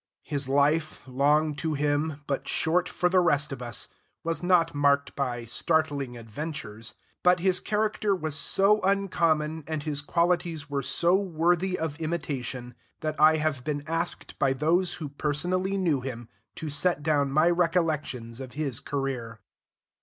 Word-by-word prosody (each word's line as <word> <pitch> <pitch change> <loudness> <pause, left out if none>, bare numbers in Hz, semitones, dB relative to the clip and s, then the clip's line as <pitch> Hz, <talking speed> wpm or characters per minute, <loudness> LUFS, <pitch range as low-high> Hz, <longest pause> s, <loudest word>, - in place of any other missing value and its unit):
His 140 -2 -3
life, 150 +3 +2
long 150 +4 +2
to 155 +1 -1
him, 145 +1 0
but 140 -1 -3
short 180 +3 +1
for 180 - +1
the 185 +1 +4
rest 150 -4 +2
of 135 - -6
us, 120 -1 -3 0.4
was 165 -2 -1
not 175 -2 +3
marked 140 -1 +2
by 125 -4 -2
startling 140 0 0
adventures, 115 -2 -6 0.3
but 180 0 +4
his 180 0 +3
character 210 -1 0
was 155 -5 -3
so 200 +6 +3
uncommon 165 -5 +1
and 155 -2 -3
his 145 -2 -1
qualities 170 -1 0
were 140 -1 0
so 170 +6 +2
worthy 180 0 +1
of 160 -1 -3
imitation, 135 -6 -3 0.3
that 155 -1 -3
I 155 +1 +7
have 150 -5 -1
been 145 0 -2
asked 165 +2 -3
by 135 -1 +3
those 170 +6 +1
who 160 -4 -5
personally 180 +7 -1
knew 165 -8 +1
him 120 -3 -6 0.3
to 155 -2 -5
set 145 +1 +1
down 145 -3 +2
my 155 +5 +4
recollections 155 -9 0
of 130 -2 -8
his 140 -5 -2
career. 130 -5 -4
155 Hz, 155 wpm, -27 LUFS, 140-170 Hz, 0.4 s, I